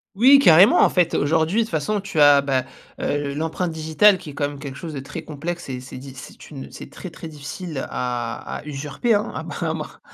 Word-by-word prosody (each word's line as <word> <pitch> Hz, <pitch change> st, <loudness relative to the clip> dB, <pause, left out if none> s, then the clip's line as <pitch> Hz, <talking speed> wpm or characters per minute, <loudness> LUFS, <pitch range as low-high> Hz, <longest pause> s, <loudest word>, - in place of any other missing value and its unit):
Oui, 260 Hz, +7 st, +7 dB
carrément. 185 Hz, -, +7 dB
En -, -, +5 dB
fait, 175 Hz, -2 st, +1 dB
aujourd'hui 160 Hz, +7 st, +1 dB
de -, -, +2 dB
toute 220 Hz, -, -10 dB
façon, 175 Hz, +6 st, -1 dB
tu 195 Hz, -5 st, -4 dB
as, 145 Hz, -1 st, +7 dB
bah, 135 Hz, -2 st, 0 dB, 0.3 s
heu, 145 Hz, -1 st, -2 dB
l'empreinte 160 Hz, +4 st, -2 dB
digitale, 160 Hz, +6 st, +4 dB
qui 180 Hz, -5 st, -10 dB
est -, -, -13 dB
quand 145 Hz, +1 st, -1 dB
même 145 Hz, -1 st, -10 dB
quelque 140 Hz, -2 st, -7 dB
chose 160 Hz, +1 st, -7 dB
de 140 Hz, -, -4 dB
très 150 Hz, +4 st, -7 dB
complexe 165 Hz, +2 st, -6 dB
et 130 Hz, -1 st, -4 dB
c'est 130 Hz, +1 st, -10 dB
diff 135 Hz, 0 st, -11 dB
c'est 135 Hz, -, -12 dB
une 135 Hz, -3 st, -8 dB
c'est -, -, -10 dB
très, 185 Hz, -, -9 dB
très 165 Hz, 0 st, -10 dB
difficile, 150 Hz, +1 st, -6 dB
à 120 Hz, -2 st, -4 dB
à -, -, -10 dB
usurper, 150 Hz, -, -1 dB
hein? 210 Hz, 0 st, 0 dB
À -, -, -5 dB
moins -, -, -4 dB
à -, -, -1 dB
moins -, -, -7 dB
155 Hz, 235 wpm, -22 LUFS, 140-180 Hz, 0.3 s, Oui